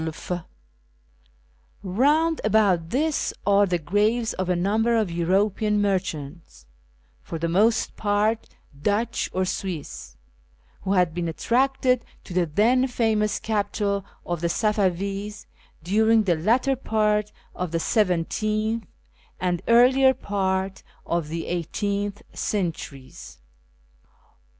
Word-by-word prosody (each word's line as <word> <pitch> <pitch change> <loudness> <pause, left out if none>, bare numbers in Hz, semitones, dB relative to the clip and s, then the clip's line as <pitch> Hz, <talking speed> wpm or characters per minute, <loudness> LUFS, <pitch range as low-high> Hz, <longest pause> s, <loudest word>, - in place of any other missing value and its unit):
Eound 295 - +2
about 200 -6 +2
this 300 - 0
are 200 0 +4
the 180 -1 +1
graves 210 +8 +1
of 185 -1 -3
a 180 - +2
number 220 +6 +1
of 215 -6 0
European 200 +5 +1
merchants, 170 - -3 0.6
for 165 - -6
the 165 +1 -1
most 210 +7 +2
part 210 +2 0 0.3
Dutch 215 +6 0
or 185 0 0
Swiss, 155 - -5 0.6
who 195 - -1
had 180 -4 +2
been 170 0 -2
attracted 250 - +1 0.2
to - - -9
the 175 -1 +1
then 235 - +3
famous 220 -4 +1
capital 205 -2 -1 0.2
of 175 -2 -3
the 170 - 0
Safavis 200 0 -1 0.4
during 220 +5 +3
the 180 -4 +2
latter 240 +11 +2
part 210 -4 0 0.2
of 180 -1 -3
the 165 +1 -1
seventeenth 215 +4 0 0.5
and 180 -1 -1
earlier 260 +3 +5
part 190 -3 -2 0.2
of 170 -2 -1
the 165 +1 -4
eighteenth 200 +4 -2
centuries. 165 -9 -4
205 Hz, 110 wpm, -24 LUFS, 180-220 Hz, 0.6 s, earlier